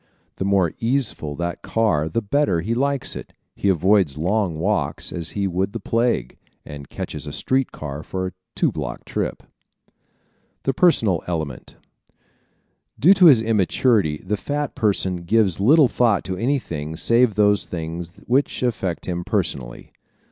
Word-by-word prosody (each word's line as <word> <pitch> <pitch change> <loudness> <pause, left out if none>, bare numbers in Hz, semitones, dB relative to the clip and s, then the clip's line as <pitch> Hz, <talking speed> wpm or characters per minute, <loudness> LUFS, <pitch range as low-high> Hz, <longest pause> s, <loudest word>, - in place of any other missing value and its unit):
The 95 - -2
more 95 -4 +2
easeful 115 - -1
that 85 +3 -4
car 100 -9 +1
the 115 +7 -1
better 105 - +1
he 110 +7 -2
likes 140 +2 -1
it. - - -9 0.2
He 100 - 0
avoids 95 -4 +3
long 90 +1 0
walks 100 +5 -1
as 85 -2 -4
he 100 - 0
would 95 +2 -1
the 115 - -4
plague, 115 - -1 0.3
and 70 -2 -9
catches - - -6
a - - -5
street 130 - 0
car 70 -1 -6
for 95 +4 -4
a 90 - -4 0.2
two - - +2
block - - -6
trip. - - -3 1.2
The 135 - 0
Personal 115 - +3
Element 80 -7 -4 1.2
¶ - - -25
Due 175 +8 +7
to 190 -2 +5
his 125 -8 +6
immaturity, 105 - +2
the 105 +3 -1
fat 145 +7 -3
person 95 -4 0
gives 95 +1 +1
little 140 +7 +6
thought 115 -4 +2
to 95 - -3
anything 85 - -2
save 115 +1 +3
those 105 -1 +3
things 85 0 -5
which 130 +1 0
affect 95 -8 -2
him 90 -1 -3
personally. - - -3
100 Hz, 155 wpm, -22 LUFS, 85-115 Hz, 1.2 s, Due